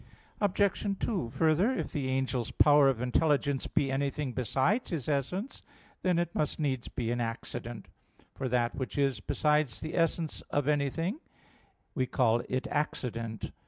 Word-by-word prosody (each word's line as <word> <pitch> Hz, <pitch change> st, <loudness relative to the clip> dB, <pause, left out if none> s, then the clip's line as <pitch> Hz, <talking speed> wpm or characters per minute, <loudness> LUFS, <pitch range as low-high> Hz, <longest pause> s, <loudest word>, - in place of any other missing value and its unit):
Obj. 200 Hz, 0 st, +1 dB
2: 185 Hz, -, -1 dB
Further, 160 Hz, -, +3 dB
if -, -, -3 dB
the 140 Hz, -4 st, -2 dB
angel's 130 Hz, -2 st, 0 dB
power 145 Hz, -2 st, +6 dB
of 125 Hz, -3 st, -1 dB
intelligence 140 Hz, +1 st, +1 dB
be 135 Hz, -2 st, +1 dB
anything 140 Hz, 0 st, -1 dB
besides 130 Hz, -, +1 dB
his 160 Hz, -8 st, -3 dB
essence, 155 Hz, -, -2 dB, 0.4 s
then 180 Hz, -2 st, +2 dB
it 170 Hz, 0 st, 0 dB
must 150 Hz, -, -1 dB
needs 130 Hz, -5 st, -1 dB
be 115 Hz, -2 st, -3 dB
an 120 Hz, 0 st, -1 dB
accident; 115 Hz, -1 st, -5 dB, 0.5 s
for 130 Hz, -, -3 dB
that 120 Hz, -1 st, +1 dB
which 130 Hz, +1 st, -5 dB
is 140 Hz, -2 st, +2 dB
besides 150 Hz, -4 st, +1 dB
the 155 Hz, -, -5 dB
essence 165 Hz, -1 st, 0 dB
of 145 Hz, -1 st, 0 dB
anything, 150 Hz, -, 0 dB, 0.7 s
we 130 Hz, -4 st, 0 dB
call 120 Hz, -2 st, +2 dB
it 130 Hz, +1 st, -1 dB
accident. 115 Hz, -6 st, -2 dB
140 Hz, 150 wpm, -30 LUFS, 125-160 Hz, 0.7 s, power